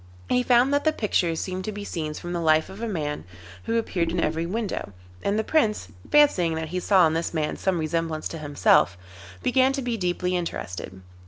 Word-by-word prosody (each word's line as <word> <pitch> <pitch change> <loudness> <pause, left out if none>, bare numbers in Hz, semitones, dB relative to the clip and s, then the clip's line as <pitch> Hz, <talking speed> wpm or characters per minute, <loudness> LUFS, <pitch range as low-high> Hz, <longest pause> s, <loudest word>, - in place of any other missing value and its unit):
He 250 - +3
found 250 +2 +4
that 285 - +2
the 315 - +3
pictures 180 - 0
seemed 185 0 -4
to 215 - -3
be 205 0 -6
scenes 155 -5 -4
from 175 0 -6
the 170 - -2
life 155 -1 +3
of 195 +3 -10
a 230 - -2
man 150 - -3 0.4
who 230 - 0
appeared 175 -7 -1
in 175 - -1
every 165 +1 0
window, 205 - -3 0.3
and 200 +1 0
the 220 - +1
Prince, 220 -6 +1 0.2
fancying 185 - +4
that 160 -1 -4
he 180 +2 -2
saw 185 -1 +5
in 160 - +2
this 165 +1 -2
man 155 -1 -1
some 190 -2 0
resemblance 160 0 -2
to 165 - -6
himself, 145 - +3 0.5
began 260 +1 +3
to 275 - -2
be 240 -2 -1
deeply 180 -1 -1
interested. 95 - -5
180 Hz, 210 wpm, -25 LUFS, 160-220 Hz, 0.5 s, saw